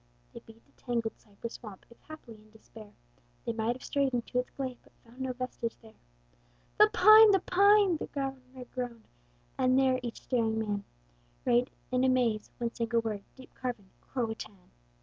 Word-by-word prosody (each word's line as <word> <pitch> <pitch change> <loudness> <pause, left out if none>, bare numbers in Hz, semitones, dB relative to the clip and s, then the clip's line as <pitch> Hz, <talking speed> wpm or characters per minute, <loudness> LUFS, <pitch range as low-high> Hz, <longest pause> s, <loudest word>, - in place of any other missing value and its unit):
They - - -8
beat 225 0 -18
the - - -30
tangled 235 -2 -3
cypress 215 +2 -9
swamp, 210 -5 -11
If 235 - -18
haply 310 -7 -12
in 215 0 -19
despair 215 -1 -14 0.5
They 235 - -1
might 225 +2 -1
have 255 - -12
strayed 275 -3 0
into 245 +1 -1
its 250 - -3
glade: 260 -2 -5
But - - -25
found 240 +3 -13
no 260 -1 -1
vestige 250 -2 -4
there. 220 -1 -17 0.9
"The - - +8
pine! 430 +3 +8
the 390 -1 +5
pine!" 400 -1 +4
the - - -5
Governor 265 -2 -6
groaned; 245 -3 -5 0.5
And 255 0 +3
there 260 -1 +3
each 235 -2 -6
staring 225 -3 0
man 205 -2 -2 0.6
Read 245 +1 +3 0.2
in 255 0 +2
a 260 - +4
maze, 235 -5 +1
one 235 -1 -3
single 230 0 0
word, 215 -3 -3
Deep 260 -1 -15
carven, 235 -7 -5
CRO 240 -4 -3
A - - -4
TÀN! 200 -4 -12
245 Hz, 185 wpm, -30 LUFS, 225-260 Hz, 0.9 s, The